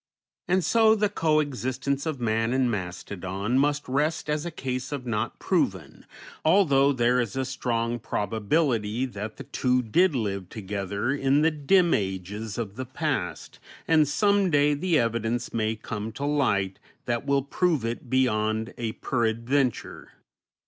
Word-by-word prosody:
And 180 0 +2
so 220 -1 +5
the 210 -1 +1
co 155 -6 +2
existence 140 0 -2
of 155 -4 -3
man 115 0 0
and 130 -2 +2
mastodon 95 +3 -3
must 145 +1 +1
rest 150 +4 0
as 150 +3 -1
a - - -2
case 130 -4 -4
of 140 -3 -4
not 115 -1 -2
proven, 95 - -1 0.4
although 145 -5 +4
there 125 -1 +2
is 115 -2 -4
a 135 0 -1
strong 120 -3 -2
probability 110 +2 0
that 105 -3 -6
the - - -7
two 125 -1 0
did 165 - +3
live 100 -6 -2
together 100 +2 -3
in 140 +1 +2
the 160 - +4
dim 170 +4 +3
ages 100 +2 -3
of 110 -3 -4
the 130 - -4
past, 130 - -3 0.3
and 155 -2 +4
some 200 +5 +2
day 145 -1 +3
the 165 +3 +1
evidence 115 0 -1
may 110 -1 0
come 110 0 -5
to 140 - -4
light 105 -10 +1 0.3
that 120 +2 -2
will 140 -1 +2
prove 155 -2 0
it 120 +2 -4
beyond 110 -3 +1
a 115 -2 -2
peradventure. 120 +2 -1
125 Hz, 150 wpm, -26 LUFS, 110-145 Hz, 0.4 s, so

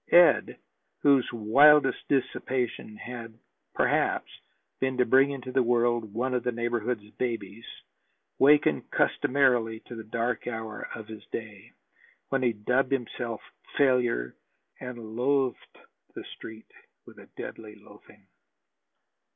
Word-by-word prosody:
Ed, 175 0 +5 0.5
whose 140 -4 +4
wildest 135 +6 +5
dissipation 125 -4 -1
had 115 -2 -8 0.4
perhaps - - +1 0.5
been 130 -1 -1
to 125 - +3
bring 135 +4 +5
into 130 -2 -6
the 130 +1 +2
world 120 -2 +1
one 125 +4 -2
of 125 - 0
the 125 - 0
neighborhood's 120 -2 -2
babies, 115 -3 -4 0.7
wakened 145 +2 +4
customarily 125 -5 +2
to - - -11
the 110 - -7
dark 115 +2 -2
hour 110 -2 -5
of 110 -1 -9
his 110 -1 -10
day, 105 -4 -8 0.6
when 135 - 0
he 125 -2 +2
dubbed 125 +5 0
himself 120 -3 -3 0.4
failure 125 - +2 0.4
and 120 -3 -8
loathed 135 +1 0 0.4
the - - -7
Street 110 0 -11 0.3
with - - -15
a - - -14
deadly 105 -1 -8
loathing. 105 -1 -18
120 Hz, 120 wpm, -27 LUFS, 110-130 Hz, 0.7 s, Ed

